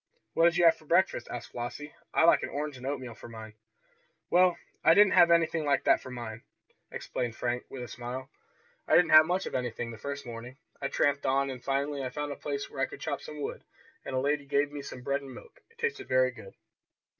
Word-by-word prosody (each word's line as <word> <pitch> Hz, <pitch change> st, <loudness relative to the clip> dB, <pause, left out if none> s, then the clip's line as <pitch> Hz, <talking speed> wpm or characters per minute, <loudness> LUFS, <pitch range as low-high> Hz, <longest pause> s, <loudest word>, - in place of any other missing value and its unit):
"What 165 Hz, -, +4 dB
did 170 Hz, 0 st, +4 dB
you 175 Hz, -, +4 dB
have 165 Hz, -, +6 dB
for 155 Hz, -, -19 dB
breakfast?" 170 Hz, -6 st, +2 dB
asked 120 Hz, -1 st, -7 dB
Flossie. 135 Hz, +5 st, -6 dB, 0.2 s
"I -, -, +3 dB
like 170 Hz, -, +6 dB
an -, -, -3 dB
orange 150 Hz, 0 st, -4 dB
and 130 Hz, +1 st, -7 dB
oatmeal 130 Hz, -4 st, -4 dB
for 115 Hz, -, -12 dB
mine." 110 Hz, -1 st, -9 dB, 0.8 s
"Well, 180 Hz, 0 st, +5 dB, 0.3 s
I 165 Hz, +1 st, +6 dB
didn't 205 Hz, -1 st, +6 dB
have 170 Hz, -, +7 dB
anything 165 Hz, -1 st, +3 dB
like 145 Hz, -1 st, +1 dB
that -, -, +4 dB
for 130 Hz, -, -9 dB
mine," 120 Hz, -3 st, -7 dB, 0.5 s
explained 120 Hz, -2 st, -4 dB
Frank 120 Hz, +1 st, -2 dB
with 130 Hz, -2 st, -6 dB
a -, -, -6 dB
smile. 125 Hz, +3 st, -7 dB, 0.6 s
"I -, -, +4 dB
didn't 175 Hz, -1 st, +5 dB
have 155 Hz, 0 st, +9 dB
much 180 Hz, +2 st, 0 dB
of -, -, -6 dB
anything 120 Hz, -2 st, -3 dB
the 115 Hz, -, -10 dB
first 140 Hz, 0 st, -5 dB
morning. 120 Hz, +2 st, -8 dB, 0.2 s
I 140 Hz, -, 0 dB
tramped 140 Hz, 0 st, +1 dB
on, 135 Hz, +1 st, +2 dB
and 125 Hz, -2 st, -8 dB
finally 140 Hz, +1 st, -1 dB
I 130 Hz, -, -2 dB
found 145 Hz, +2 st, -4 dB
a -, -, -4 dB
place 140 Hz, -1 st, -4 dB
where 135 Hz, -, -6 dB
I -, -, +2 dB
could -, -, -10 dB
chop 145 Hz, -3 st, -3 dB
some 150 Hz, +1 st, -8 dB
wood, -, -, -5 dB, 0.4 s
and -, -, -5 dB
a -, -, +2 dB
lady 145 Hz, +1 st, 0 dB
gave 145 Hz, +1 st, +1 dB
me 145 Hz, -1 st, -6 dB
some 130 Hz, -2 st, -9 dB
bread 140 Hz, +2 st, 0 dB
and 135 Hz, -2 st, -10 dB
milk. -, -, -14 dB
It 460 Hz, -, -27 dB
tasted 465 Hz, -1 st, -2 dB
very -, -, +3 dB
good." 485 Hz, -, -13 dB
140 Hz, 235 wpm, -29 LUFS, 125-155 Hz, 0.8 s, have